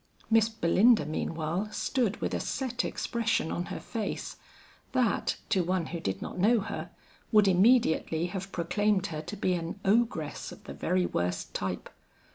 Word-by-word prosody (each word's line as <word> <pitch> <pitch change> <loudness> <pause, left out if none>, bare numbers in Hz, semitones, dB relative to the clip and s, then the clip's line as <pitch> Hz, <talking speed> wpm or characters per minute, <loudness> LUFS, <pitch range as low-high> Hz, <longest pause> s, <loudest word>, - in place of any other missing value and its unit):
Miss 225 0 +5
Belinda 220 +1 +4
meanwhile 165 +6 -2
stood 235 -3 -1
with - - -1
a - - 0
set 250 -3 -2
expression 230 -8 -1
on 175 - -2
her - - -5
face, 220 -3 -4 0.6
that, 250 -5 +1
to 185 - +3
one 180 -1 0
who 170 +2 -5
did 95 -8 -3
not - - -6
know 225 +5 +4
her, 210 - -5 0.4
would 210 -3 +6
immediately 185 -5 +4
have 190 +1 -5
proclaimed 195 +3 +1
her 155 - -3
to 205 +7 -7
be 185 -2 +1
an 170 +2 -3
ogress 230 +4 +1
of - - -12
the - - -8
very 180 0 +1
worst 90 - -2
type. 95 -2 -3
190 Hz, 160 wpm, -29 LUFS, 165-225 Hz, 0.6 s, would